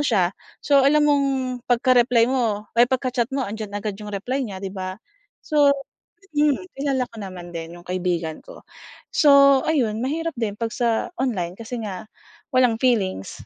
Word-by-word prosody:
siya, 200 -11 +2 0.3
so 280 -1 +5
alam 295 +2 +4
mong 285 -1 +3 0.4
pagka-reply 245 -1 +4
mo, 235 -5 0 0.2
ay 245 - +6
pagka-chat 255 -2 0
mo 270 - 0
'andiyan 215 0 -5
agad 205 +1 -3
'yong 210 - -7
reply 255 +7 -2
niya 200 -6 -5
'di 190 - -5
ba. 185 -1 -5 0.5
So 295 -3 +4 0.7
mm, 300 +5 +1
kilala 270 -2 -1
ko 230 - -18
naman 180 -3 -8
din 165 +1 -7
'yong 175 - -15
kaibigan 175 -3 -2
ko. - - -14 0.5
So 280 -2 +6
ayun 235 -9 0
mahirap 325 +6 -2
din 225 -5 -3
'pag 225 0 -3
sa 235 +6 0
online, 185 -10 -1
kasi 230 +5 -7
nga 200 +1 -7 0.4
walang 250 -4 +2
feelings 200 - 0
235 Hz, 160 wpm, -23 LUFS, 200-275 Hz, 0.7 s, ay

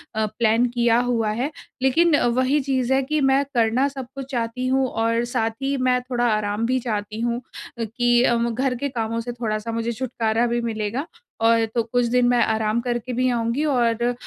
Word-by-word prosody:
अ, 220 0 +1
plan 225 +2 +2
किया 235 -1 +2
हुआ 235 -3 0
है। 250 +7 -2 0.3
लेकिन 320 +5 +4 0.2
वही 260 +3 +2
चीज़ 265 -1 0
है 270 - +3
कि 305 +3 -1
मैं 270 +1 +3
करना 235 +3 +2
सब 270 -3 -7
कुछ 275 0 -7
चाहती 240 +1 -2
हूँ 265 0 +2
और 230 +1 0
साथ 235 -2 0
ही 275 +1 0
मैं 255 -1 +2
थोड़ा 245 -1 -1
आराम 210 +1 -1
भी 255 +2 +1
चाहती 215 -2 -4
हूँ 240 +1 -1 0.4
कि 240 +2 +2
अ, 240 - +3
घर 235 +3 0
के 280 +4 -3
कामों 230 -2 -2
से 245 +1 -5
थोड़ा-सा 230 -2 -3
मुझे 230 +1 -2
छुटकारा 230 -1 -1
भी 235 0 -1
मिलेगा 225 +4 -3 0.4
और 230 0 +4
तो 235 - +3
कुछ 240 +2 0
दिन 245 +1 +2
मैं 245 -1 +3
आराम 220 +1 0
करके 245 0 -3
भी 255 +1 +1
आऊँगी 235 +4 0
और 240 -5 +1
अ, 245 +1 +1
240 Hz, 200 wpm, -22 LUFS, 230-255 Hz, 0.4 s, लेकिन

